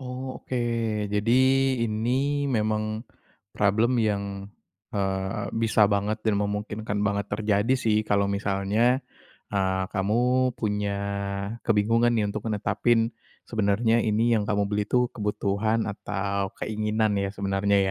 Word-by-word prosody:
Oh, 130 0 -6
oke. 130 - -4 0.6
Jadi, 105 +3 +1 0.5
ini 130 +6 0
memang 110 -1 -1 0.5
problem 110 +4 +2
yang, 100 -2 -2 0.4
eee, 95 +1 -2
bisa 110 -2 +3
banget 100 +2 0
dan 110 -2 +2
memungkinkan 105 +1 -3
banget 100 0 0
terjadi 105 +4 +1
sih. 110 -3 +2
Kalau 100 -1 +3
misalnya, 100 +5 +1 0.5
eee, 95 -1 0
kamu 125 +6 +2
punya 105 -2 -1 0.7
kebingungan 115 +2 +3
nih 110 -3 +1
untuk 100 - -5
netapin 115 +2 +1 0.4
sebenernya 110 +1 +2
ini 115 +2 +2
yang 105 - +1
kamu 105 -1 +1
beli 105 0 0
itu 125 -1 +2
kebutuhan 105 +1 0
atau 100 -1 -3
keinginan, 110 0 0
ya, 100 0 -1
sebenarnya, 100 0 +1
105 Hz, 115 wpm, -26 LUFS, 100-115 Hz, 0.7 s, bisa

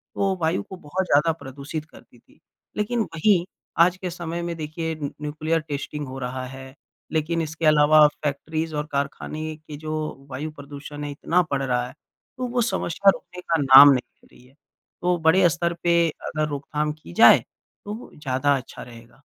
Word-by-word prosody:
तो 195 -1 +1
वायु 160 +3 +1
को 190 - -10
बहुत 185 +2 -3
ज़्यादा 150 0 +3
प्रदूषित 140 +3 -7
करती 165 - -18
थी। - - -27 0.4
लेकिन 210 +3 -1
वही 175 -1 +2 0.3
आज 175 +2 +5
के 185 -1 -4
समय 170 0 -5
में 170 0 -3
देखिए, 160 +1 -4
न 145 -2 -5
न्यूक्लियर 155 +2 -1
टेस्टिंग 150 -1 -5
हो 130 +1 -7
रहा 130 0 -4
है, 130 0 -10 0.4
लेकिन 160 +1 0
इसके 160 +1 -4
अलावा 155 0 +6 0.2
फैक्ट्रीज़ 155 +2 -2
और 150 0 -2
कारखाने 155 +2 -3
के 155 -1 -10
जो 155 +1 -5 0.4
वायु 140 +4 -5
प्रदूषण 145 0 -9
है 145 - -4
इतना 165 +5 +1
बढ़ 140 -1 0
रहा 125 -2 0
है, 125 - -12 0.4
तो 255 0 -2
वो 245 0 0
समस्या 200 -4 +2
रुकने 180 - -11
का 165 -3 0
नाम 135 +1 +10
नहीं 130 -2 +2 0.2
ले - - -23
रही 125 - -19
है। 130 - -24 0.5
तो 180 0 +2
बड़े 160 +3 +4
अ, - - +8
स्तर 170 +1 -1
पे 170 -1 +4
अगर 155 0 -3
रोकथाम 150 +1 -2
की 150 - -14
जाए, - - +8 0.5
तो 205 - -4
वो 225 - -10
ज़्यादा 140 -1 +1
अच्छा 130 - -10
रहेगा। 120 +2 -15
155 Hz, 185 wpm, -24 LUFS, 140-170 Hz, 0.5 s, नाम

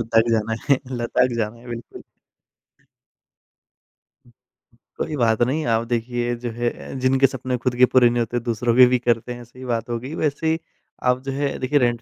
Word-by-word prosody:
लटक 115 0 +2
जाना 110 0 +1 0.2
है 135 - +6 0.2
लटक 120 +1 +1
जाना 110 +1 -2
है, 120 - -15
बिल्कुल। 120 0 -8 3.0
कोई 155 - -2
बात 115 -4 +2
नहीं, 135 +6 +1
आप 115 -1 +1
देखिए 120 +1 -1
जो 120 - -2
है 120 +1 -1 0.3
जिनके 130 +1 +4
सपने 130 -1 -3
खुद 125 -2 0
के 125 - +7
पूरे 125 -1 +5
नहीं 120 0 -1
होते 120 +1 -1
दूसरों 115 0 -1
के 125 0 +9
भी - - +5
करते 120 0 0
हैं, 120 0 -9
सही 125 +2 -12
बात 115 -1 -2
हो 120 - -1
गई। 135 +6 -7
वैसे 155 0 -1
ही 160 +1 +1 0.5
आप 125 0 +2
जो 135 - -3
है 140 +1 -2
देखिए 140 +3 +2
रेंट 120 -2 +1
120 Hz, 185 wpm, -22 LUFS, 115-130 Hz, 3.0 s, के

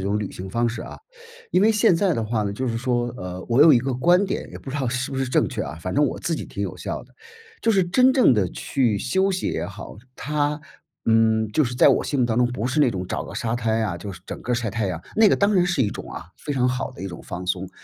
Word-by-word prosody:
一 - - -4
种 100 +2 0
旅 105 - -3
行 95 +1 -7
方 120 +3 +1
式 115 0 -5
啊， - - -9 0.5
因 190 - +4
为 220 - +5
现 215 -3 +4
在 180 +1 +2
的 115 -6 -1
话 110 -1 -1
呢， 100 - -2
就 130 +6 -3
是 115 -2 -1
说， 120 0 0
呃， 90 -4 -6
我 125 +5 +5
有 160 - +8
一 - - +6
个 130 +2 -2
观 175 +9 +3
点 - - -4
也 - - -9
不 - - -12
知 135 - -3
道 135 -3 -1
是 125 +3 -2
不 - - -3
是 135 - 0
正 125 - +2
确 - - -3
啊， - - -6
反 90 +2 -4
正 150 - +4
我 140 - -2
自 165 - -1
己 - - -5
挺 - - -8
有 - - -3
效 - - -5
的。 - - -26 0.5
就 230 - +2
是 195 -4 +3
真 255 +9 +4
正 255 - +5
的 95 -5 +1
去 120 -7 0
休 190 - +1
息 185 - -2
也 - - -2
好， - - -9 0.2
它， 150 +1 -1 0.4
嗯， 110 -1 +3
就 155 - +3
是 125 -2 -2
在 - - +6
我 - - +4
心 140 - -2
目 125 - +3
当 115 -1 -1
中， 125 - +4
不 125 -2 -3
是 140 +4 +1
那 130 - +4
种 95 -4 -4
找 - - -3
个 - - -9
沙 115 0 -2
滩 115 -1 0
啊， 100 -6 -1
就 100 +3 -7
是 90 - -12
整 - - -7
个 125 - -2
晒 115 -2 -1
太 110 -4 -1
阳， 85 -3 -4
那 220 -1 +6
个 - - +3
当 200 +1 +2
然 180 -2 +4
是 175 -6 +1
一 105 - +1
种 - - -8
啊， 85 - -9
非 150 - -5
常 125 -2 +2
好 125 +1 -2
的 130 - -13
一 95 - -4
种 85 - -8
放 90 0 -7
松。 95 0 -2
125 Hz, 320 characters per minute, -23 LUFS, 110-150 Hz, 0.5 s, 有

